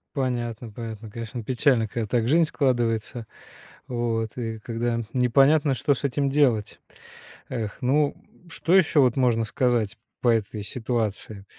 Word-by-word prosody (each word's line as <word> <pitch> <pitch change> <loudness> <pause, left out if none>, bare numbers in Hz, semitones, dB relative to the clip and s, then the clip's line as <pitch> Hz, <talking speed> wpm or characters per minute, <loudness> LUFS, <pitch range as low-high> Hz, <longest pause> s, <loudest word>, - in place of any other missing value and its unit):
Понятно, 120 -4 -2
понятно, 110 0 -7
конечно 115 +3 -6
печально, 120 0 +2
когда 115 +2 -3
так 115 +1 0
жизнь 165 +6 +4
складывается, 120 -5 0 0.6
вот 115 -2 -2
и 115 -2 -3
когда 115 +1 -2
непонятно 135 +4 +4
что 135 +4 +1
с 140 - -4
этим 140 +1 0
делать. 130 -7 +1 0.7
Эх, 110 -3 -4
ну 140 +3 +2 0.4
что 165 +2 +1
еще 165 -5 +4
вот 125 -3 +4
можно 120 -4 +2
сказать 120 -4 0 0.2
по - - -1
этой 110 -2 0
ситуации. 110 -3 -3
120 Hz, 135 wpm, -25 LUFS, 115-135 Hz, 0.7 s, жизнь